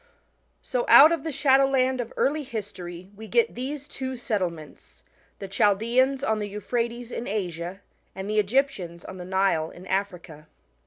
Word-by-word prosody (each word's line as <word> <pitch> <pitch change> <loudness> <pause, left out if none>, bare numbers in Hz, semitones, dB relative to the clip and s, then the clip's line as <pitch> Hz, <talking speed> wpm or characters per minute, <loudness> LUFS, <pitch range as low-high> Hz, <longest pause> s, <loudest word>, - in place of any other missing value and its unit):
So - - -1
out 305 +3 +9
of 335 - 0
the 320 - -4
shadowland 265 -2 +3
of 235 - -7
early 300 +3 +1
history 195 -8 -7
we 220 +2 -10
get 470 - +2
these 275 +3 -5
two 260 -3 -5
settlements 180 - -5 0.4
t*he 195 - -6
Chaldeans 235 +7 +2
on 220 -4 +1
the 205 -1 -3
Euphrates 235 +3 -3
in 235 - -5
Asia 180 -2 -4 0.3
and 190 +1 -5
the 215 0 +1
Egyptians 205 -6 -1
on 185 - -8
the 180 - -7
Nile 190 -4 +1
in 180 - -13
Africa. 180 -6 -4
215 Hz, 155 wpm, -25 LUFS, 185-260 Hz, 0.4 s, out